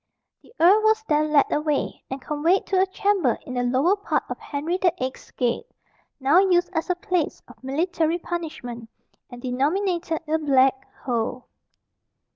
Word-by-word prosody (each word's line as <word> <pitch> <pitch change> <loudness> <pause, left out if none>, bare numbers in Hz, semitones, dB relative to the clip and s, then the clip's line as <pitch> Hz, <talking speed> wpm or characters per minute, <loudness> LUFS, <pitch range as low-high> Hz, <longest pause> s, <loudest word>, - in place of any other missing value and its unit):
The - - -21
earl 380 +6 +6
was 440 0 +3
then 305 0 +2
led 290 -2 +4
away, 300 -1 -1
and 265 - -4
conveyed 300 +7 +1
to 375 -1 +2
a 385 - +2
chamber 380 - +1
in 255 - -7
the 245 - 0
lower 260 +10 +2
part 410 - -1
of - - -5
Henry 315 +5 -3
the 360 - +4
Eighth's 255 +1 -5
gate, 245 - -2 0.5
now 285 +6 +5
used 360 -2 +3
as 325 +2 -2
a 360 - +2
place 360 -4 -2
of - - -17
military 325 +4 0
punishment, 305 -10 -6 0.4
and 245 0 -11
denominated 330 +6 -1
the 315 +1 0
"black 265 -3 +2
hole." 245 0 -2
315 Hz, 160 wpm, -24 LUFS, 265-360 Hz, 0.5 s, earl